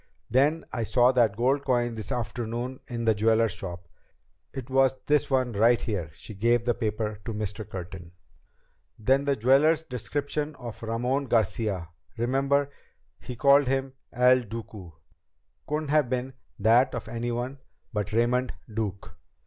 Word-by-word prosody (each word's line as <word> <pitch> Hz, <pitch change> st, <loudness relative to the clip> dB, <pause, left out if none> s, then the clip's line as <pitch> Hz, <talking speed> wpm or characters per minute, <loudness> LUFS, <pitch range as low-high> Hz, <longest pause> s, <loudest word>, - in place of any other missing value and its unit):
"Then 145 Hz, +6 st, +3 dB
I 120 Hz, -, -2 dB
saw 125 Hz, +3 st, +4 dB
that 115 Hz, -5 st, +2 dB
gold 135 Hz, +4 st, +2 dB
coin 120 Hz, -3 st, +1 dB
this 110 Hz, -2 st, -6 dB
afternoon 120 Hz, +1 st, -3 dB
in 120 Hz, -1 st, -4 dB
the 110 Hz, -, +5 dB
jeweler's 110 Hz, +1 st, +2 dB
shop. 90 Hz, -2 st, -7 dB, 0.6 s
It 130 Hz, -3 st, -7 dB
was 135 Hz, 0 st, +3 dB
this 150 Hz, 0 st, +2 dB
one 130 Hz, -2 st, +1 dB
right 115 Hz, +3 st, +4 dB
here." 100 Hz, -9 st, -3 dB
She 110 Hz, -, -10 dB
gave 115 Hz, +4 st, +2 dB
the 120 Hz, -, +2 dB
paper 105 Hz, -2 st, -3 dB
to 115 Hz, -, -4 dB
Mr. 105 Hz, 0 st, -4 dB
Curtin. 90 Hz, -2 st, -8 dB, 0.9 s
"Then 135 Hz, +6 st, +2 dB
the 140 Hz, -1 st, +2 dB
jeweler's 140 Hz, +7 st, +4 dB
description 145 Hz, +3 st, -3 dB
of 120 Hz, -5 st, -9 dB
Ramon 125 Hz, +5 st, -1 dB
Garcia 105 Hz, -6 st, 0 dB, 0.3 s
remember, 135 Hz, +4 st, +1 dB, 0.5 s
he 125 Hz, -, -7 dB
called 140 Hz, +2 st, +5 dB
him 135 Hz, 0 st, -1 dB, 0.2 s
El 125 Hz, +1 st, +4 dB
Duque? 105 Hz, -7 st, -9 dB, 0.7 s
couldn't 150 Hz, 0 st, -2 dB
have 150 Hz, -4 st, +3 dB
been 130 Hz, +1 st, -2 dB, 0.2 s
that 120 Hz, +6 st, +4 dB
of 115 Hz, -, -5 dB
anyone 120 Hz, +3 st, -3 dB, 0.3 s
but 105 Hz, -1 st, -2 dB
Raymond 120 Hz, +3 st, +1 dB, 0.2 s
Duke. 105 Hz, -3 st, -4 dB
120 Hz, 145 wpm, -27 LUFS, 110-135 Hz, 0.9 s, the